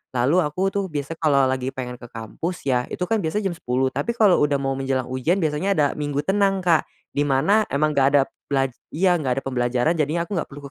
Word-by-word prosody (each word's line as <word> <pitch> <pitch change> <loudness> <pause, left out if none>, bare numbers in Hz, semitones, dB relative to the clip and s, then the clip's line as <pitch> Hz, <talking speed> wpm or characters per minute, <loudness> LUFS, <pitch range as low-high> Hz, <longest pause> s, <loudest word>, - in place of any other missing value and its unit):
lalu 130 +9 +3
aku 180 +4 0
tuh 200 0 -1
biasa 145 -3 -4
kalau 140 -4 +3
lagi 130 0 -1
pengen 125 -1 -5
ke 120 - -10
kampus, 120 - -6
ya 125 -2 0
itu - - -4
kan 220 +5 0
biasa 200 +4 -1
jam 195 - 0
10 130 -6 -1
tapi, 235 - -2
kalau 210 -6 +4
udah 145 -1 +2
mau 135 -1 -1
menjelang 135 -1 -1
ujian 130 +7 +1
biasanya 160 +6 0
ada 150 -3 +3
minggu 145 -1 -2
tenang, 195 +1 +1
Kak. 170 -3 +3 0.2
Di 145 +1 0
mana 160 +11 +3
emang 155 +2 +1
enggak 140 -2 +3
ada 140 - +6 0.3
pelaj 135 -2 +1 0.2
iya, 180 +1 +3
enggak 135 -2 -1
pembelajaran 125 +2 0
jadinya 165 0 0
aku 170 - -13
enggak - - -4
perlu 145 0 -11
145 Hz, 220 wpm, -23 LUFS, 130-175 Hz, 0.3 s, ada